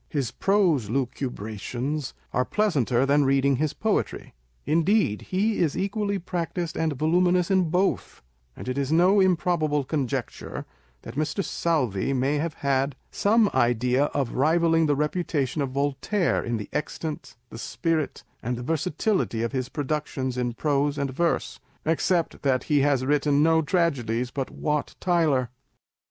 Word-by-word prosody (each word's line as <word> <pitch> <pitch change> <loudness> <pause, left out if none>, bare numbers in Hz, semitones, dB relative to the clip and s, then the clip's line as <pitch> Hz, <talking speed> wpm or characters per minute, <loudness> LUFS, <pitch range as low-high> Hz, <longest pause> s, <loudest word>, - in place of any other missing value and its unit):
His 140 -7 -2
prose 180 - +2
lucubrations 125 +2 -3 0.2
are 125 - +2
pleasanter 135 - +1
reading 140 -1 +3
than 130 - -1
his 155 -2 0
poetry. 220 -1 -1 0.3
Indeed 165 - +2
he 205 +4 +1
is 160 -5 +1
equally 200 +1 -1
practised 175 -1 -3
and 160 -2 0
voluminous 175 +5 +2
in 185 -3 +3
both; 180 - -1 0.3
and - - -9
it 130 +2 -1
is 140 +1 -1
no 180 +5 +5
improbable 170 -5 +2
conjecture, 135 -3 -3 0.4
that 115 - -8
Mr. 155 +8 -1
Southey 135 - 0
may 135 +3 +1
have 160 +1 -2
had 135 0 +1 0.2
some 215 +1 +3
idea 125 +3 +2
of 135 -4 -2
rivalling 165 +3 +3
the 145 - +2
reputation 150 -1 -1
of 140 - -1
Voltaire 145 +8 0
in 120 -1 -2
the 105 - -6
extent, 150 +1 -4 0.2
the 115 - -8
spirit, 160 +2 -2 0.2
and 125 +1 -2
the 125 - -6
versatility 160 - 0
of 115 - -1
his 130 -2 -2
productions 145 -3 -2
in 125 -1 -1
prose 145 +2 0
and 140 -1 -1
verse, 170 +5 -1 0.3
except 165 +2 0
that 135 -3 +1
he 150 -2 +2
has 135 -2 +2
written 145 +1 +2
no 160 0 +4
tragedies 130 - 0
but 135 -1 -3
Wat 150 -1 -2
Tyler 155 -9 +1
150 Hz, 145 wpm, -25 LUFS, 130-170 Hz, 0.4 s, no